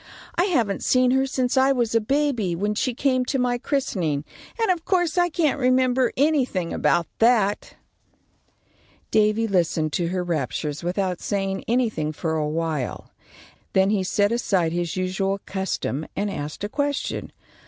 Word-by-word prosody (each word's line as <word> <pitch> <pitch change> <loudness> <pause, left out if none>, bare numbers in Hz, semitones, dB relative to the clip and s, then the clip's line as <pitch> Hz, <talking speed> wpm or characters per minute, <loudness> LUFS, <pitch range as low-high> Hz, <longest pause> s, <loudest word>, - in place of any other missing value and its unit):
I 350 - +2
haven't 235 - 0
seen 255 0 +3
her 265 +1 +2
since 255 -2 0
I 265 +1 +4
was 240 -4 0
a 230 - +3
baby, 245 -7 0
when 205 +4 -1
she 240 +3 -1
came 255 -1 +1
to 270 - -1
my 245 -1 0
christening, 175 - -1 0.3
and 450 -4 +3
of 345 -3 -2
course 350 -4 +1
I 350 -1 +3
can't 305 -3 +1
remember 255 -1 +3
anything 255 - +1
about 170 - +2
that." 225 -3 +2 1.4
Davy 215 +1 +3
listened 165 -5 0
to 175 - 0
her 180 +1 -1
raptures 150 -1 -3
without 180 0 -1
saying 195 -1 -2
anything 220 -11 0
for 160 +1 -2
awhile. 155 -2 -2 0.6
Then 190 +1 +3
he 200 -3 +1
set 205 +3 +1
aside 190 -8 +1
his 175 -1 -2
usual 190 +2 -1
custom 190 -6 -3
and 205 0 -1
asked 150 +2 -6
a 205 - -2
question. 285 +3 -2
210 Hz, 155 wpm, -24 LUFS, 175-255 Hz, 1.4 s, I